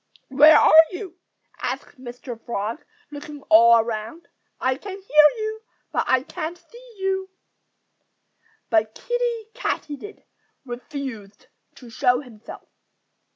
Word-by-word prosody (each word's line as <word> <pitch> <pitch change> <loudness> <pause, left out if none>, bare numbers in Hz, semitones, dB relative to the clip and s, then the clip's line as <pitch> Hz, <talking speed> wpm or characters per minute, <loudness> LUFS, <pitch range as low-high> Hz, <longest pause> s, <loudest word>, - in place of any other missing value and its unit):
"Where 300 +4 +7
are 320 +1 +8
you?" 360 -1 -8 0.4
asked - - -5
Mr. 240 -1 -9
Frog, 225 +4 -4 0.3
looking 290 0 -9
all 230 +2 +8
around. 225 +7 -4 0.3
"I 260 0 0
can 385 +7 -8
hear 300 -6 +5
you, 435 0 -4 0.3
but - - 0
I 260 0 +2
can't 335 +3 -6
see 470 +8 -17
you." 385 0 -2 1.4
But 220 -1 +1
Kiddie 475 -2 -3
Katydid 410 - -5 0.4
refused 240 -5 -8 0.3
to 245 -3 -14
show 250 +3 +2
himself. 230 -6 -13
290 Hz, 110 wpm, -23 LUFS, 235-380 Hz, 1.4 s, are